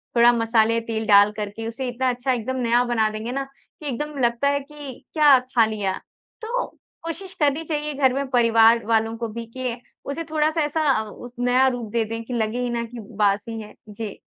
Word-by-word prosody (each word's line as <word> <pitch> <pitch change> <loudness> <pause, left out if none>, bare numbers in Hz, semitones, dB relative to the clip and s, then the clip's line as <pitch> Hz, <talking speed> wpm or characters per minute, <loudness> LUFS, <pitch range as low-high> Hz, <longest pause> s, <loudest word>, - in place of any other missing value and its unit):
थोड़ा 235 0 +7
मसाले 230 -1 +2
तेल 225 -1 -3
डाल 205 0 +7
करके 210 +2 -5
उसे 250 +3 -4
इतना 255 +1 0
अच्छा 250 +2 -1
एकदम 250 +2 -3
नया 240 +1 +3
बना 235 -3 +1
देंगे 215 +2 -5
ना, 275 +2 -2 0.4
कि 300 - -7
एकदम 295 +3 -4
लगता 235 +3 +2
है 285 0 +1
कि 285 -1 -9 0.2
क्या 295 -4 +7
खा 250 -2 +2
लिया। 210 -3 -2 0.5
तो 475 +3 -2 0.4
कोशिश 350 +3 -6
करनी 295 +1 +2
चाहिए 300 -1 -3
घर 270 -2 +3
में 275 +1 -2
परिवार 230 -2 +5
वालों 225 0 +1
को 230 0 -3
भी, 230 +1 -6
कि 245 +1 -4 0.3
उसे 280 +4 -3
थोड़ा-सा 310 +1 +1
ऐसा 300 +2 0
अ, 220 -4 +1
उस 245 +3 -10
नया 250 +2 +4
रूप 245 -4 -3
दे 230 0 +1
दें 225 +1 -5
कि 245 - -7
लगे 225 0 -1
ही 245 - -1
ना 235 -1 -1
कि 235 +1 -9
बासी 210 +1 -1
हैं। 210 - -11 0.2
जी। 210 0 -6
240 Hz, 205 wpm, -23 LUFS, 225-275 Hz, 0.5 s, थोड़ा